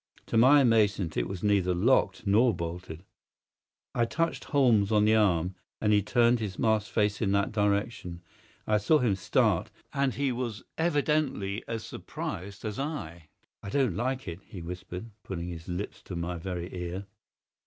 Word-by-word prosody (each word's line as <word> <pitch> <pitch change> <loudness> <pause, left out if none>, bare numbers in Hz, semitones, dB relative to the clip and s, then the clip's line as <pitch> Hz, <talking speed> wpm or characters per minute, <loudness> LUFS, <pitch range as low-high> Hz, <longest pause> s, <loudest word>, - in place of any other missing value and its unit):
To - - -4
my 130 +6 +7
amazement 105 - +2
it - - 0
was 95 -2 -6
neither 100 -3 +2
locked 100 -1 +2
nor 110 +3 +4
bolted! 85 0 -6 0.9
I 120 - +2
touched 165 +8 -1
Holmes 115 -8 +3
on 105 -1 +4
the 110 - +4
arm, 95 -5 +2 0.3
and 105 -1 +2
he 105 - +5
turned 120 +3 +3
his 100 -4 -4
masked 110 -2 +1
face 105 -2 +1
in 100 -3 +1
that 100 0 +1
direction. 100 -4 -1 0.4
I 105 -1 +2
saw 155 +9 +4
him 120 -7 +2
start, 95 -1 +1 0.2
and 140 -2 +1
he 140 -1 0
was 120 -3 -4
evidently 145 - 0
as 115 -1 -4
surprised 100 +5 -6
as 105 +1 -4
I. 85 - -5 0.3
"I - - -7
don't 125 -5 +1
like 130 +3 -2
it," 85 0 -5
he 95 - -10
whispered, 90 +5 -7
putting 90 -2 -5
his 85 -1 -8
lips 90 +3 -5
to 90 - -6
my 85 0 -3
very 90 0 -5
ear. 90 +2 -4
105 Hz, 165 wpm, -29 LUFS, 90-120 Hz, 0.9 s, my